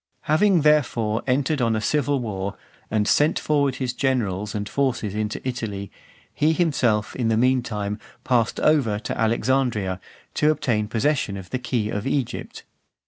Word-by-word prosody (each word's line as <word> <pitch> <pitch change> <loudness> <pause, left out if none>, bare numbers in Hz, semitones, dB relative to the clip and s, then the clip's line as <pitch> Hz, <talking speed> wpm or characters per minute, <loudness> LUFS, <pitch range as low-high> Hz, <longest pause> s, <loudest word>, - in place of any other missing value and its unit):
VII. - - -50
Having, 175 +3 +3
therefore, 120 -7 +2
entered 135 +2 +1
on 115 -2 +2
a - - 0
civil 145 +3 +1
war, 100 -4 -4 0.3
and 105 -1 +1
sent 150 +6 +3
forward 145 -3 +1
his 125 -2 -2
generals 105 -7 -1
and 105 0 -3
forces 120 -7 -1
into 110 +4 -3
Italy, 105 -6 -4 0.4
he 155 +2 +2
himself, 125 -11 +1
in 120 -3 -1
the 110 -1 +2
meantime, 115 -5 0 0.2
passed 120 -3 +1
over 135 -9 +3
to 115 +3 -4
Alexandria, 115 -4 0 0.3
to 150 - +2
obtain 120 -8 0
possession 115 -2 0
of 95 -2 -10
the 130 - -1
key 120 -3 -1
of 105 +5 -3
Egypt. 135 -3 -3
120 Hz, 155 wpm, -23 LUFS, 105-140 Hz, 0.4 s, Having